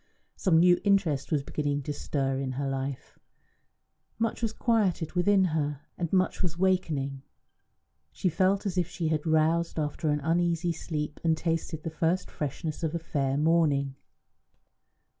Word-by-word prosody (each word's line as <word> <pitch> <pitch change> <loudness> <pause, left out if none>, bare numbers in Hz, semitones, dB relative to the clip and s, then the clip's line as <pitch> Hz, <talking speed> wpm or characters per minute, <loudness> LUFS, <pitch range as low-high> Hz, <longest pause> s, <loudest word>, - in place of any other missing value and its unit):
Some 180 -5 +3
new 175 +1 +5
interest 195 -10 +2
was 145 -3 +1
beginning 145 -1 -2
to 145 - -3
stir 135 -2 -1
in 135 -1 -2
her 140 +2 -2
life; 135 0 -4 1.0
much 225 0 -1
was 225 -2 0
quieted 205 -10 +1
within 190 +2 +4
her, 150 -2 -1
and 170 -3 -3
much 185 -1 +1
was 170 -3 -2
wakening. 155 -8 0 0.9
She - - -2
felt 190 +4 +2
as 185 -2 0
if 175 - 0
she 165 -3 -2
had 155 0 -1
roused 160 +2 +2
after 155 +1 -1
an 150 0 +1
uneasy 170 +2 +1
sleep 150 -2 -4
and 160 -1 +2
tasted 165 -1 -2
the 165 - -4
first 170 +3 0
freshness 155 +2 -4
of 160 0 -1
a - - +2
fair 140 -4 -1
morning. 150 -3 +2
160 Hz, 155 wpm, -28 LUFS, 145-175 Hz, 1.0 s, new